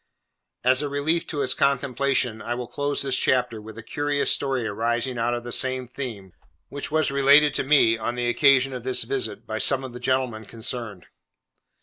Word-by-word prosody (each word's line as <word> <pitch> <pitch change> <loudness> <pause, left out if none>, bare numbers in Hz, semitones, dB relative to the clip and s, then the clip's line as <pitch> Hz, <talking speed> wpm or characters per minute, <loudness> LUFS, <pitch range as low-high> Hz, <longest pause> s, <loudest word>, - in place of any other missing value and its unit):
As 130 +2 +4
a 145 - -2
relief 155 +4 0
to 145 -2 -2
its 130 - +1
contemplation, 135 -3 0
I 120 - -3
will 125 0 -5
close 145 +4 -1
this 135 -2 +1
chapter 125 -5 +1
with 110 +1 -11
a 115 - -8
curious 145 +3 0
story 135 -4 0
arising 120 +4 -2
out 120 +1 0
of 120 - -6
the 120 - -7
same 130 +1 0
theme, 115 -8 -7 0.4
which 140 0 -5
was 155 -1 +1
related 140 +1 +5
to - - 0
me, 135 -5 +4
on 120 +2 -3
the 120 0 -1
occasion 135 +1 +3
of 125 - -5
this 130 0 +1
visit, 405 -1 -4
by - - -4
some 135 -1 +1
of 130 -2 -8
the 125 - -8
gentlemen 125 -3 -1
concerned. 115 -3 -5
130 Hz, 195 wpm, -24 LUFS, 120-140 Hz, 0.4 s, related